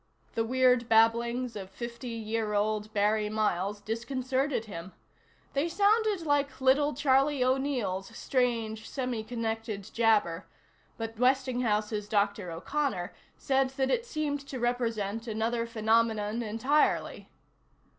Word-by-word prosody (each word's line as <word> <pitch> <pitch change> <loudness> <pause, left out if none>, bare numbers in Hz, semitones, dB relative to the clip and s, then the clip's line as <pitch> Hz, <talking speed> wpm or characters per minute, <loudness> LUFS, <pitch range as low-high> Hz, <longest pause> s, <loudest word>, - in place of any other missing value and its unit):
The 225 - 0
weird 250 0 +3
babblings 235 +2 +3
of 195 -2 -6
fifty 235 +4 -7
year 220 -1 -2
old 215 +1 0
Barry 210 0 +1
Miles 210 -2 0
disconcerted 250 +3 -2
him. 185 -3 -8 0.6
They 285 +5 0
sounded 410 0 +2
like 285 -2 +1
little 275 +2 +3
Charlie 275 0 +3
O'Neill's 255 -8 0
strange 230 -4 -1
semi 250 -4 -2
connected 225 -2 -3
jabber, 210 -6 +2 0.5
but 225 -1 -5
Westinghouse's 245 -5 +1
Dr. 200 -3 0
O'Connor 185 - -2 0.2
said 270 -1 +1
that 265 -1 +1
it 475 -1 0
seemed 305 -7 -2
to 260 - -5
represent 230 -2 -1
another 230 +1 -1
phenomenon 220 -1 +1
entirely. 235 +7 0
230 Hz, 115 wpm, -29 LUFS, 215-260 Hz, 0.6 s, weird